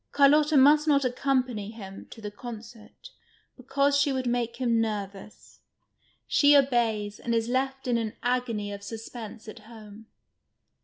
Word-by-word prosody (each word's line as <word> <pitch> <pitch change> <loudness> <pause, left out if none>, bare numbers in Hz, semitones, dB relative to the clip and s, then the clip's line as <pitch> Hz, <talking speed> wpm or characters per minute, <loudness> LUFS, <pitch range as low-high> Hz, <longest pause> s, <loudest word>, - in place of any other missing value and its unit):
Carlotta 295 +2 +4
must 295 +3 +5
not 280 -2 +3
accompany 250 -4 -1
him 195 -4 -10
to 225 - -12
the 210 -1 -6
concert, 230 - -11 0.4
because 275 +2 0
she 280 0 +2
would 260 -1 -2
make 240 -1 -1
him 235 -2 +1
nervous. 205 -2 -6 0.7
She 290 0 +5
obeys, 225 -6 0
and 235 -1 -2
is 225 0 0
left 265 +1 -2
in 240 -1 +1
an 220 -2 -3
agony 240 -4 -1
of 200 - -8
suspense 225 +1 -9
at 215 +2 -9
home. 215 -1 -14
235 Hz, 145 wpm, -27 LUFS, 215-270 Hz, 0.7 s, must